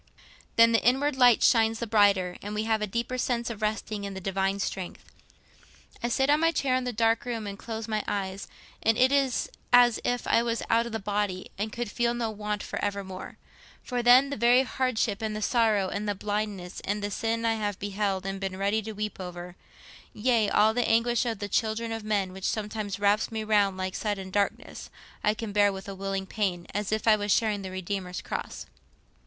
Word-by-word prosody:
Then 230 0 +7
the 230 - +3
inward 270 +4 +2
light 245 -3 +5
shines 225 -2 +4
the 235 - -3
brighter, 200 -5 +3
and 205 +1 -5
we 215 - -1
have 220 -1 0
a 210 - -1
deeper 235 +4 -3
sense 235 -2 -1
of 220 -2 -8
resting 215 -1 -2
on 200 -1 -5
the - - -5
Divine 195 +1 -1
strength. 190 -2 -5 0.9
I 240 - 0
sit 265 +3 +2
on 295 +1 +4
my 330 +1 +3
chair 270 -5 +1
in 255 0 -1
the 250 - -1
dark 225 0 +2
room 230 -3 -4
and 200 -1 -5
close 225 +1 -6
my 215 -1 -1
eyes, 195 -1 -3 0.3
and 225 0 +2
it 255 +1 +4
is 275 -3 +1 0.2
as 245 -2 +6
if 245 -1 -1
I - - +3
was 235 -1 -1
out 230 +1 +3
of - - -7
the 225 - -2
body 205 -2 -2
and 210 +2 -3
could 235 -2 -4
feel 240 +1 0
no 230 -2 -2
want 210 0 -4
for - - -5
evermore. 200 -2 -4 0.5
For 245 -1 -2
then, 250 +3 +6
the - - -3
very 240 +3 +5
hardship, 250 -5 -1
and 215 -1 -2
the - - -3
sorrow, 215 -5 +2
and 205 +2 -3
the 205 - -1
blindness, 205 -3 -3
and 205 +1 -3
the 205 - -2
sin 230 +3 -1
I 225 - +3
have 205 -3 -2
beheld 200 -1 -2
and 195 0 -3
been 190 -1 -4
ready 200 +3 +1
to 220 +1 -6
weep 210 -1 -4
over—yea, 185 +5 -3
all 215 +2 +4
the 245 +1 0
anguish 235 +1 +2
of 225 -2 -2
the 205 0 -4
children 225 +2 -1
of 225 -1 -4
men, 200 -3 -1
which 190 0 -7
sometimes 210 -2 -3
wraps 205 +2 +2
me 220 -1 -3
round 205 -3 +2
like 185 0 -3
sudden 195 -3 -3
darkness—I 205 +1 -3
can 225 -1 -5
bear 205 0 +4
with 190 0 -8
a 195 - -5
willing 195 0 -3
pain, 185 -3 -2
as 205 0 -2
if 215 +1 -1
I 220 - +7
was 205 -1 -2
sharing 210 -1 +2
the 190 - -6
Redeemer's 185 0 -4
cross. - - -5
215 Hz, 210 wpm, -27 LUFS, 200-230 Hz, 0.9 s, Then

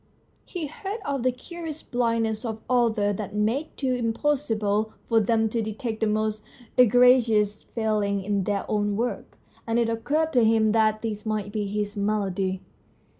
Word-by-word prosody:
He 350 -4 -5
heard 390 +9 -6
of 275 -2 -1
the 255 +1 +2
curious 320 +4 -8
blindness 230 -2 0
of 220 -2 -5
authors 220 -5 +2
that 210 -1 -5
made 225 +9 0
it - - -12
im 250 -3 +1
possible 220 -7 0
for 225 - +4
them 225 +1 +2
to 230 +1 -1
detect 220 +1 -4
the 220 - +1
most 215 0 -1 0.3
egregious 240 -4 +5
failings 210 -3 -1
in 200 -2 0
their 200 -1 -1
own 205 -1 0
work, 240 +2 -3 0.3
and 230 +1 +1
it 235 -1 +2
occurred 295 +8 0
to 245 -3 +4
him 220 -1 +4
that 215 0 +2
this 210 -2 -3
might 215 -2 -2
be 210 -1 -2
his 205 0 -3
malady. 195 -2 -1
220 Hz, 165 wpm, -25 LUFS, 210-245 Hz, 0.3 s, egregious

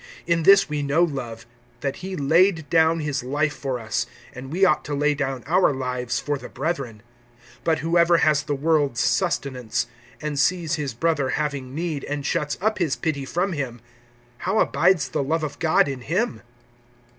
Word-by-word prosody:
(16)In 170 -2 +1
this 195 0 +7
we 150 -1 -2
know 145 +4 +2
love, 120 -8 -4 0.4
that 140 -1 -2
he 190 +1 -6
laid 160 +2 +3
down 160 0 +4
his 145 -4 -2
life 145 +4 0
for 130 -3 -3
us; 115 +1 -2 0.3
and 130 +1 -9
we 190 +4 +3
ought 180 - +2
to 145 - -3
lay 150 +1 +2
down 135 -3 -3
our 180 +2 +3
lives 125 -2 -2
for 145 -1 -2
the - - -9
brethren. 135 -7 -4 0.6
(17)But 160 -1 +3
whoever 170 +1 +3
has 150 -2 +3
the 145 -1 -2
world's 145 -4 +1
sustenance, 125 - 0 0.3
and 150 -2 -3
sees 170 +1 +1
his 145 -7 -2
brother 145 -1 +1
having 140 -3 -3
need, 160 -3 -3
and 145 -1 -4
shuts 150 0 -1
up 215 +2 0
his 165 -6 +1
pity 140 -4 -2
from 180 +7 -1
him, 130 -6 -4 0.6
how 190 +4 -1
abides 180 -9 +3
the - - -1
love 155 +4 -1
of 145 -2 -5
God 160 -3 +3
in 135 -2 -4
him? 165 - -1
150 Hz, 180 wpm, -23 LUFS, 135-165 Hz, 0.6 s, this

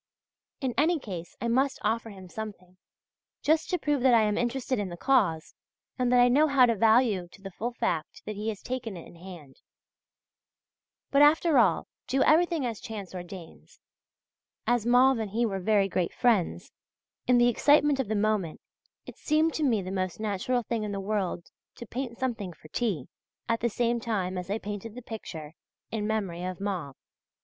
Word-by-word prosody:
In 260 -3 -1
any 330 +4 +3
case 180 - -8
I 235 - -2
must 265 +4 +1
offer 225 +2 0
him 190 -3 -11
something, 185 -3 -8 0.7
just 315 +1 +2
to 360 - +1
prove 295 -5 0
that 250 -1 +5
I 225 - +5
am 210 -1 +1
interested 245 0 -1
in 200 -2 -2
the 175 - -7
cause, 195 - +1 0.5
and 250 -1 +2
that 250 - +5
I 245 - +7
know 290 +5 +4
how 275 -3 +5
to 235 - +2
value 220 -3 +3
to 175 - -17
the 195 0 -8
full 230 +6 -3
the 245 - -18
fact 170 -9 -2
that 215 - -5
he 210 +2 -3
has 210 -3 -6
taken 235 -6 -4
it 170 - -10
in - - -14
hand. 170 -6 -12 1.5
But, 280 - +4
after 300 0 +5
all, 220 - +3 0.2
do 265 +1 +2
everything 330 -2 +3
as 230 -3 -3
chance 205 -5 -7
ordains.... 175 -1 -10 0.9
As 240 -2 +1
Mauve 250 +1 +5
and 220 -2 -3
he 230 +4 0
were 195 -4 -2
very 200 +1 +2
great 180 -2 -2
friends, 195 - +1 0.6
in 250 0 +5
the 240 0 +5
excitement 290 +3 +4
of 265 - 0
the 215 - -1
moment 205 -5 0 0.5
it - - -11
seemed 315 +1 +2
to 315 - -2
me 225 -8 +2
the 185 - -5
most 185 -1 -2
natural 220 +4 -1
thing 230 0 -2
in 210 -1 -3
the 200 - -3
world 195 -4 -2 0.2
to 235 - -9
paint 240 0 -5
something 230 -8 -3
for 155 - -17
T. 195 - -1 0.4
at 230 0 +1
the 235 - 0
same 235 +1 0
time 200 -5 -2
as 180 0 -5
I 205 - 0
painted 210 +1 -6
the 250 - -8
picture 160 -10 -8 0.4
"In 210 -1 -2
Memory 195 -6 -2
of 185 0 -4
Mauve." 180 -9 -3
220 Hz, 190 wpm, -28 LUFS, 190-250 Hz, 1.5 s, I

